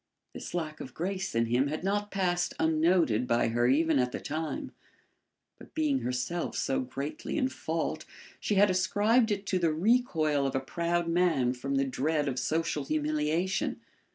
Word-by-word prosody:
This -, -, -7 dB
lack 155 Hz, -3 st, -3 dB
of 130 Hz, -, -9 dB
grace 190 Hz, 0 st, -3 dB
in 115 Hz, 0 st, +3 dB
him 125 Hz, +4 st, +2 dB
had 155 Hz, +4 st, -4 dB
not 205 Hz, +2 st, 0 dB
passed 180 Hz, -3 st, 0 dB
unnoted 160 Hz, -7 st, +2 dB
by 115 Hz, -1 st, +2 dB
her 120 Hz, +1 st, +2 dB
even 155 Hz, +2 st, +3 dB
at 125 Hz, 0 st, +1 dB
the -, -, -4 dB
time, 155 Hz, +1 st, -4 dB, 0.9 s
but -, -, -15 dB
being 300 Hz, -4 st, +1 dB
herself 130 Hz, -, -2 dB
so 135 Hz, -, 0 dB
greatly 140 Hz, -, -4 dB
in 265 Hz, -3 st, +1 dB
fault 160 Hz, -9 st, -3 dB, 0.3 s
she 210 Hz, -, -1 dB
had 200 Hz, 0 st, +5 dB
ascribed 210 Hz, +6 st, +3 dB
it 200 Hz, -1 st, -2 dB
to 190 Hz, -2 st, 0 dB
the 165 Hz, -2 st, +2 dB
recoil 160 Hz, -, +2 dB
of 135 Hz, -, -3 dB
a -, -, +2 dB
proud 170 Hz, +5 st, -1 dB
man 165 Hz, -8 st, +2 dB
from 135 Hz, +2 st, -3 dB
the 135 Hz, 0 st, +2 dB
dread 145 Hz, +3 st, 0 dB
of 130 Hz, -2 st, -1 dB
social 160 Hz, -3 st, -1 dB
humiliation. 155 Hz, +5 st, 0 dB
160 Hz, 170 wpm, -29 LUFS, 135-185 Hz, 0.9 s, had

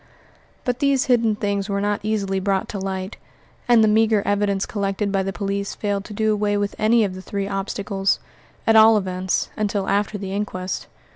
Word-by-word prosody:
But 250 Hz, -1 st, -1 dB
these 280 Hz, -2 st, +2 dB
hidden 230 Hz, -4 st, +3 dB
things 200 Hz, -1 st, -2 dB
were 200 Hz, 0 st, 0 dB
not 205 Hz, 0 st, 0 dB
easily 200 Hz, -3 st, -1 dB
brought 190 Hz, 0 st, 0 dB
to 200 Hz, -, -4 dB
light; 190 Hz, +1 st, -4 dB, 0.5 s
and 235 Hz, -2 st, +6 dB
the -, -, +5 dB
meagre 215 Hz, -1 st, +3 dB
evidence 200 Hz, -1 st, +1 dB
collected 200 Hz, 0 st, -2 dB
by 195 Hz, -1 st, +1 dB
the 195 Hz, 0 st, -2 dB
police 200 Hz, 0 st, -3 dB
failed 200 Hz, -1 st, -2 dB
to -, -, -8 dB
do 220 Hz, 0 st, +2 dB
away 205 Hz, 0 st, 0 dB
with 205 Hz, 0 st, -1 dB
any 225 Hz, +2 st, +4 dB
one 205 Hz, -3 st, +1 dB
of -, -, -8 dB
the 185 Hz, -, -8 dB
three 200 Hz, +1 st, -3 dB
obstacles 195 Hz, 0 st, -1 dB, 0.5 s
at 225 Hz, -, +4 dB
all 220 Hz, 0 st, +8 dB
events, 185 Hz, -2 st, -1 dB
until 205 Hz, -2 st, -1 dB
after 205 Hz, +1 st, 0 dB
the 195 Hz, -1 st, -5 dB
inquest. 190 Hz, -2 st, -3 dB
205 Hz, 195 wpm, -22 LUFS, 195-215 Hz, 0.5 s, all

